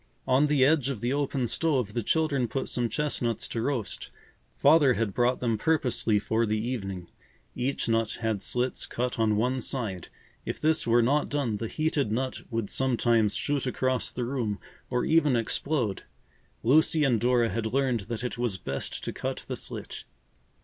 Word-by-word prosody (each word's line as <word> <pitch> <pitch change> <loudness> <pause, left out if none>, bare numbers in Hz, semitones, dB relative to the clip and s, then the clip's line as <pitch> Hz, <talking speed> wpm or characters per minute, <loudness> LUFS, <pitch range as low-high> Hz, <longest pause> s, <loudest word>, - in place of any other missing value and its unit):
On 130 +3 +3
the 145 -3 +4
edge 140 -2 +3
of 130 -6 -3
the 120 +4 -1
open 140 -2 0
stove 130 -5 0
the 120 - -1
children 140 0 +1
put 135 - -3
some 120 -1 -1
chestnuts 125 -6 -1
to 115 - -2
roast. 120 -5 -3 0.5
Father 145 -6 +5
had 110 -4 -1
brought 125 +3 +2
them 115 -3 0
purposely 120 -8 +1
for 110 +2 0
the 110 +1 0
evening. 95 -6 -4 0.5
Each 130 +1 -1
nut 115 -1 0
had 110 -3 -1
slits 125 +1 -1
cut 125 0 -3
on 110 -1 +3
one 125 +4 0
side. 110 -9 -3 0.4
If - - -4
this 155 -2 +1
were 120 +1 +4
not 145 +5 +1
done, 135 -7 -1
the 115 - -4
heated 150 -4 0
nut 130 +3 -2
would 115 -4 -2
sometimes 120 -4 +2
shoot 145 -2 -1
across 130 0 0
the 125 - -4
room 120 -5 -2 0.3
or 125 -1 0
even 155 -5 +3
explode. 115 -1 0 0.6
Lucy 155 +5 +4
and 125 -6 +2
Dora 120 -1 +3
had 110 -1 -2
learned 130 0 +1
that 115 0 -3
it 125 -1 -4
was 120 -6 0
best 70 -5 -4
to - - -3
cut - - -4
the - - -3
slit. - - -5
125 Hz, 175 wpm, -27 LUFS, 115-135 Hz, 0.6 s, Father